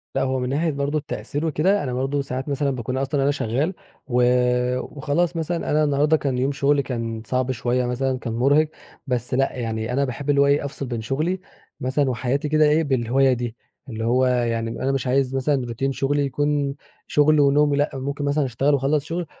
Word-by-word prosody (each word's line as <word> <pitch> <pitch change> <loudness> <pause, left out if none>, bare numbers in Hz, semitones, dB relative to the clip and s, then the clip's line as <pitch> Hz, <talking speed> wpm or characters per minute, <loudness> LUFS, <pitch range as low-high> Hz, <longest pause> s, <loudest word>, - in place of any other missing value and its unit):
لآ، - - +1
هو 130 0 0
من 125 0 -2
ناحية 155 +4 0
برضو 140 +1 -1
التأثير 150 +1 -4
وكده، 180 +6 +2
أنا 130 -3 -3
برضو 135 +3 -1
ساعات 135 +1 -4
مثلًا 140 0 0
باكون 125 0 -3
أصلًا 135 +1 0
أنا 140 - +3
شغال 140 - -1 0.3
و 125 -1 +2 0.6
وخلاص 155 +6 -1
مثلًا 165 +1 -2
أنا 155 +1 +3
النهاردة 150 +2 +3
كان 135 -4 -2
يوم 130 +3 +1
شغلي 140 0 +2
كان 115 -3 -4
صعب 130 0 0
شوية، 125 0 0
مثلًا 130 +1 -1
كان 115 -3 -4
مرهِق، 140 +6 +3 0.4
بس 125 -2 -2
لأ، 135 +1 +1
يعني 115 -1 -3
أنا 140 +2 +2
باحب 135 +3 -5
اللي 140 -1 +4
هو 140 - +4
إيه، 140 0 +2
أفصل 140 0 -5
بين 120 -3 -4
شغلي 155 +11 -1 0.4
مثلًا 130 +2 0
وحياتي 130 +4 -1
كده 155 0 +4
إيه 150 +2 +3
بالهواية 130 -1 +2
دي. 120 -1 -4 0.3
اللي 115 -1 -4
هو 125 +2 +3
يعني 120 -2 0
أنا 135 - +1
مش 135 -2 -1
عايز 135 +1 +1
مثلًا 135 -1 +1
routine 135 +4 -2
شغلي 140 +2 0
يكون 145 0 0 0.3
شغل 150 +1 +4
ونوم 145 +1 +4
و - - +2
لأ، 145 +1 +1
ممكن 140 +2 -3
مثلًا 145 0 +1
أشتغل، 135 +4 +1
وأخلص 140 +1 +1
شغل 170 +2 -3
135 Hz, 200 wpm, -23 LUFS, 125-145 Hz, 0.6 s, اللي